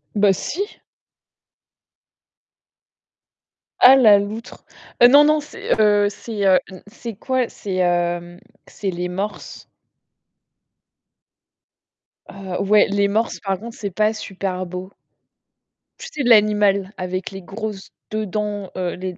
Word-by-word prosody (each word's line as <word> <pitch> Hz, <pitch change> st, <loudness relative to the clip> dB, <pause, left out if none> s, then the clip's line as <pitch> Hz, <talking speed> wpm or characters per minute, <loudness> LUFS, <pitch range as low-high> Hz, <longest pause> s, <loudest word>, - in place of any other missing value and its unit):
Bah 200 Hz, -1 st, +4 dB
si! 400 Hz, -, -5 dB, 3.0 s
Ah 260 Hz, +2 st, +9 dB
la 220 Hz, -6 st, +7 dB
loutre, 210 Hz, +3 st, -6 dB, 0.4 s
heu, 245 Hz, -, +11 dB
non, 285 Hz, +3 st, +7 dB
non, 305 Hz, +1 st, +3 dB
c'est, 295 Hz, -6 st, -3 dB
heu, 205 Hz, -1 st, +4 dB
c'est, 215 Hz, +1 st, -8 dB
hem, 190 Hz, -2 st, +5 dB, 0.3 s
c'est 230 Hz, +1 st, -8 dB
quoi? 255 Hz, +3 st, -1 dB
C'est, 195 Hz, -2 st, -6 dB
hem, 175 Hz, -1 st, -1 dB, 0.3 s
c'est 200 Hz, -, -5 dB
les 180 Hz, 0 st, -3 dB
morses. 200 Hz, +4 st, -6 dB, 2.6 s
Heu, 190 Hz, -2 st, -6 dB
ouais, 210 Hz, +1 st, +5 dB
les 200 Hz, 0 st, +1 dB
morses, 220 Hz, +3 st, -1 dB
par 195 Hz, -2 st, -3 dB
contre, 230 Hz, +1 st, -9 dB
c'est 200 Hz, -3 st, -5 dB
pas 215 Hz, +3 st, +1 dB
super 190 Hz, -3 st, -5 dB
beau. 180 Hz, +2 st, -7 dB, 1.1 s
Tu 485 Hz, -, -9 dB
sais, 285 Hz, -, -3 dB
l'animal 210 Hz, -4 st, +3 dB
avec 185 Hz, 0 st, -4 dB
les 195 Hz, 0 st, -8 dB
grosses 205 Hz, +1 st, -7 dB, 0.2 s
2 215 Hz, 0 st, -2 dB
dents, 205 Hz, -1 st, -4 dB
heu, 180 Hz, -1 st, -2 dB
les 185 Hz, -1 st, -6 dB
205 Hz, 120 wpm, -20 LUFS, 185-220 Hz, 3.0 s, heu